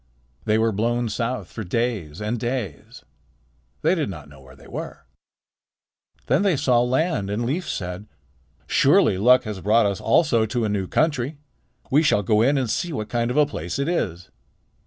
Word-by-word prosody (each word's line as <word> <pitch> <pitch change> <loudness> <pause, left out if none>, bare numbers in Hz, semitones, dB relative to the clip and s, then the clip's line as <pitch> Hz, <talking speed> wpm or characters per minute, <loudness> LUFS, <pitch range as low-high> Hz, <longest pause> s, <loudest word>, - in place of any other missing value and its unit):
They 110 0 +2
were 115 0 +2
blown 115 +3 0
south 115 +4 -3
for 110 - -6
days 105 -6 -2
and 110 +3 -2
days. 115 - -5 0.8
They - - +4
did 160 - -1
not 75 -6 -8
know 70 -1 -16
where 65 0 -16
they - - -17
were. - - -7 1.2
Then 135 +7 +2
they 195 -6 +2
saw 125 -2 +3
land, 130 - 0
and 110 +4 -2
Leif 160 +9 -2
said: 90 +2 -5 0.6
"Surely 95 - +3
luck 125 +5 +5
has 105 -5 -6
brought 110 +3 +3
us 100 -1 -1
also 115 -3 +3
to 120 +1 -1
a - - -1
new 100 -2 -1
country. 145 - 0 0.5
We 150 +4 +4
will 105 - +2
go 105 +3 +2
in 140 +5 +3
and 130 -2 0
see 170 +10 -2
what 110 -8 -4
kind 120 -1 0
of 125 - -2
a 150 - +6
place 85 - -5
it 140 +1 -1
is." 90 - -2
115 Hz, 180 wpm, -23 LUFS, 100-130 Hz, 1.2 s, a